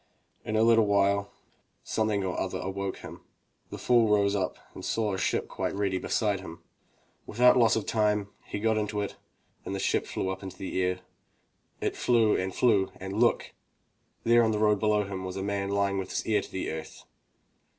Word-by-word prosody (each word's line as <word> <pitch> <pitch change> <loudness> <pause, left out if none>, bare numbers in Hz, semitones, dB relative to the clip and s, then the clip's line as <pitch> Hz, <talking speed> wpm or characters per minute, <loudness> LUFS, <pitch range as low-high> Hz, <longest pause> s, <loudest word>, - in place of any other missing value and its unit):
In 110 - -3
a 110 - +4
little 115 -2 +5
while, 100 0 +2 0.5
something 110 -2 0
or 95 -1 -2
other 95 - -2
awoke 95 +1 -4
him. - - -10 0.5
The - - -7
fool 120 -3 +3
rose 100 -1 +3
up 95 -2 -2 0.2
and - - -10
saw 110 -2 0
the 95 - -3
ship - - 0
quite - - -3
ready 100 -2 0
beside 105 -1 0
him. 85 -3 -10 0.6
Without 125 +3 +5
loss 115 -3 +4
of 110 - -2
time, 105 -2 +1 0.2
he - - -5
got 110 0 +1
into 105 0 -2
it, 100 - -4 0.5
and 100 - -4
the - - -3
ship - - 0
flew 95 - -3
up 95 0 -4
into 95 -2 -8
the 95 -1 -3
air. 90 0 -1 0.8
It - - -1
flew 115 -3 +3
and 95 +1 -1
flew 100 -3 +2
and 95 +1 -7
look! 120 - +2 0.3
— - - -44
there 120 0 +5
on 110 - +2
the 110 - 0
road 105 -1 +3
below 105 0 +2
a - - -3
man 95 -1 -5
was 95 0 -5
lying 100 0 -1
with 95 -1 -5
his - - -3
ear 105 -2 +2
to - - -11
the 95 - -3
earth. 80 0 -8
100 Hz, 200 wpm, -28 LUFS, 95-110 Hz, 0.8 s, little